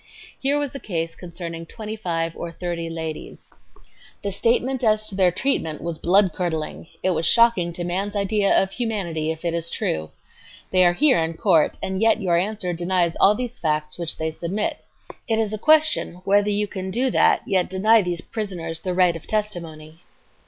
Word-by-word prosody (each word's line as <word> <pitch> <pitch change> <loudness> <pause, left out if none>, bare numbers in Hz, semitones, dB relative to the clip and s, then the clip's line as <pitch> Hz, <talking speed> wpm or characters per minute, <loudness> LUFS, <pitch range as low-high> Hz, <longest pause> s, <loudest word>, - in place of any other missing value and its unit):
"Here 280 +2 +2
was 290 -2 -2
a 275 - -6
case 165 -7 -3
concerning 170 -2 -7
twenty 215 +2 -7
five 165 -5 -2
or 170 - -5
thirty 170 -1 -4
ladies. 160 -1 -7 0.7
The 200 - -2
statement 245 +6 +1
as 215 -1 +3
to 195 - -6
their 190 -2 +4
treatment 165 - -1
was 170 -1 -5
bloodcurdling; 175 -4 +1 0.2
it 185 - +3
was 165 -1 +1
shocking 230 -7 +4
to 175 - -5
man's 195 +4 -2
ideas 200 0 +2
of 195 - 0
humanity 190 -10 -2
if 160 +1 -4
it 170 - 0
is 170 0 -2
true. 80 - -2 0.6
They 185 -1 +5
are 175 - +3
here 265 +5 +4
in 165 0 -1
court, 165 -3 +3
and 190 +1 -2
yet 225 0 +4
your 180 -5 +1
answer 190 -1 -1
denies 175 0 0
all 205 +2 +6
these 245 +1 -5
facts 150 0 -1
which 170 -2 -3
they 160 0 -2
submit, 180 +6 -3 0.4
It 225 -2 +1
is 220 -1 0
a 215 - -3
question 310 - +3
whether 205 +1 +3
you 210 0 +1
can 190 -2 -6
do 250 +6 0
that - - +4
anal - - -12
yet 185 -2 +2
deny 215 +4 +4
these 175 -2 -2
petitioners 175 -8 -5
the 185 -1 -2
right 180 -2 +4
of 165 - -9
testimony." 165 -7 -4
185 Hz, 190 wpm, -23 LUFS, 165-215 Hz, 0.7 s, all